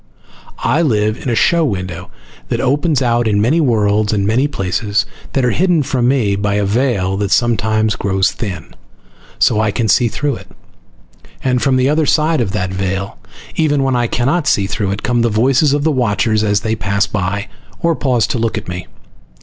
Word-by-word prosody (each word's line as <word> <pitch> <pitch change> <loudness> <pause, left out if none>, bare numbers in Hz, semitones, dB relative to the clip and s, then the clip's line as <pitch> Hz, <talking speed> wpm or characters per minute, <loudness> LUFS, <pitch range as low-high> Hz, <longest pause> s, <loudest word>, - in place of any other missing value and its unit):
I 160 - +2
live 110 -8 +1
in - - -3
a 120 - 0
show 170 +7 +3
window 95 - -4 0.4
that - - -1
opens 145 +1 +1
out 120 -1 +1
in 105 -2 +1
many 130 +11 +2
worlds 105 -5 +1
and 100 -2 0
many 120 +7 +2
places 100 -3 -1 0.3
that 135 -2 +1
are 125 - +2
hidden 175 - +2
from 130 -3 0
me 120 -7 +1
by 100 0 -1
a 105 0 +1
veil 100 -4 0
that 100 -1 -1
sometimes 110 -1 +1
grows 95 0 0
thin, 95 -8 -6 0.6
so 105 - +3
I 110 -1 +1
can 110 +2 -1
see 120 +3 +3
through 140 +3 -2
it. - - -13 1.0
And 125 -1 +1
from 135 -1 +2
the 130 0 +2
other 150 +1 +1
side 155 -2 +2
of 105 -5 -2
that 95 -2 -2
veil, 95 +1 -3 0.4
even 145 -3 +1
when 135 -1 +1
I 120 -1 +1
cannot 140 +8 0
see 100 - +2
through 100 0 -2
it, 100 +2 -4
come 120 -1 +1
the 115 - +2
voices 130 +6 +2
of 145 0 0
the 160 - +2
watchers, 110 -4 +1
as 105 -1 +1
they 110 0 -1
pass 100 -2 0
by, 100 +3 -3 0.3
or 170 -2 +2
pause 125 -7 +1
to 125 - -2
look 115 -3 -1
at - - -6
me. 90 0 -6
115 Hz, 200 wpm, -16 LUFS, 100-135 Hz, 1.0 s, show